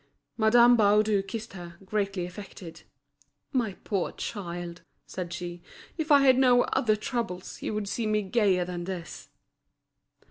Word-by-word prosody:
Madame 240 +2 +6
Baudu 210 -1 +4
kissed 220 +3 -7
her, 175 -2 -9
greatly 200 -2 -1
affected. 175 -3 -10 0.7
"My 235 -6 0
poor 195 -5 -1
child," 175 -4 -6 0.2
said 180 -2 -6
she, 175 0 -6 0.3
"if 315 -2 -2
I 285 -1 +7
had 260 -2 +5
no 250 -2 +5
other 215 -3 +1
troubles, 220 -5 -4
you - - -3
would 210 -1 -2
see 220 +2 -2
me 215 0 +1
gayer 190 -3 +2
than 175 -1 -5
this." 180 -3 -7
200 Hz, 140 wpm, -27 LUFS, 180-230 Hz, 0.7 s, I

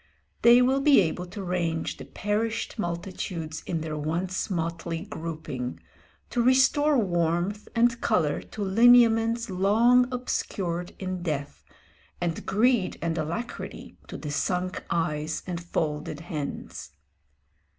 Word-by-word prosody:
They 240 +1 +7
will 265 +2 +2
be 280 -3 +6
able 180 0 0
to 200 +2 -7
range 170 -3 -1
the - - -9
perished 220 +3 -2
multitudes 170 -3 -4
in 165 -2 -1
their 155 -1 -4
once 170 +7 -2
motley 165 -1 -3
grouping, 160 -9 -5 0.5
to 245 - +1
restore 270 +4 +4
warmth 175 0 0
and 235 0 +3
colour 160 -10 +1
to 210 - -6
lineaments 230 +2 +5
long 230 +7 +4
obscured 180 -8 -3
in 185 -1 -4
death, 145 -4 -4 0.6
and 170 -2 -2
greed 220 -2 +2
and 165 -1 -1
alacrity 170 +10 -5
to - - -7
the 150 - -5
sunk 180 +4 -1
eyes 155 -2 -1
and 175 -2 -4
folded 150 -2 -3
hands. 155 -5 -6
180 Hz, 120 wpm, -27 LUFS, 165-230 Hz, 0.6 s, They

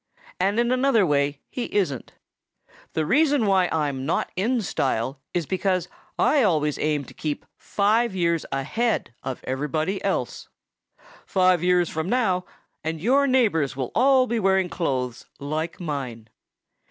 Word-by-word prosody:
And 200 +4 +1
in 240 +1 +2
another 255 -5 +3
way 145 -2 0
he 250 - -3
isn't. 170 - -2 0.8
The 160 - 0
reason 285 - +3
why 190 -3 +3
I'm 145 -4 -1
not 155 - -1
in 225 +5 0
style 130 -4 -1
is 175 -3 -1
because 185 +1 -1 0.3
I 295 - +3
always 155 - +1
aim 150 -2 0
to - - -13
keep 150 -2 -4
five 215 +1 +1
years 170 -3 +1
ahead 140 - -1
of 130 -2 -5
everybody 155 +8 -2
else. - - -2 0.8
"Five 185 -3 +3
years 180 -1 +3
from 160 +3 -3
now 190 -7 +1 0.4
and 160 0 -3
your 270 - +3
neighbors 210 - +2
will 130 -2 -3
all 260 +1 +4
be 235 -2 -1
wearing 190 -2 +2
clothes 130 -9 -2
like 155 +4 -3
mine." 130 -9 -5
180 Hz, 140 wpm, -24 LUFS, 145-215 Hz, 0.8 s, all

